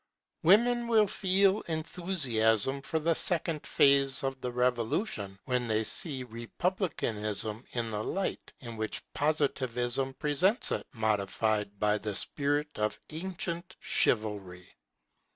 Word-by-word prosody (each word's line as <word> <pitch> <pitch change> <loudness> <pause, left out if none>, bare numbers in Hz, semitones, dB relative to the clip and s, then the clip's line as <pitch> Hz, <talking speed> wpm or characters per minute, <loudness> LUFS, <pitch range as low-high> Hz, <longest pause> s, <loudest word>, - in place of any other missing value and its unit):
Women 235 +6 +4
will 220 -2 +5
feel 195 +1 +2
enthusiasm 140 - 0
for 160 - -2
the 165 +2 +2
second 165 -2 +1
phase 140 -1 +4
of 135 -1 -3
the 125 - -3
Revolution, 120 - -1
when 125 -2 0
they 110 0 +1
see 140 - -1
republicanism 115 - -3
in 115 -2 -2
the 105 0 -2
light 195 - -3
in 115 -3 -7
which 110 0 -2
Positivism 135 -3 0
presents 165 - +2
it, - - -2
modified 105 -1 -1
by 105 0 +2
the 105 -2 -4
spirit 145 +6 -1
of 105 0 -1
ancient 175 +1 -3
chivalry. 100 -5 0
135 Hz, 115 wpm, -30 LUFS, 110-165 Hz, -, will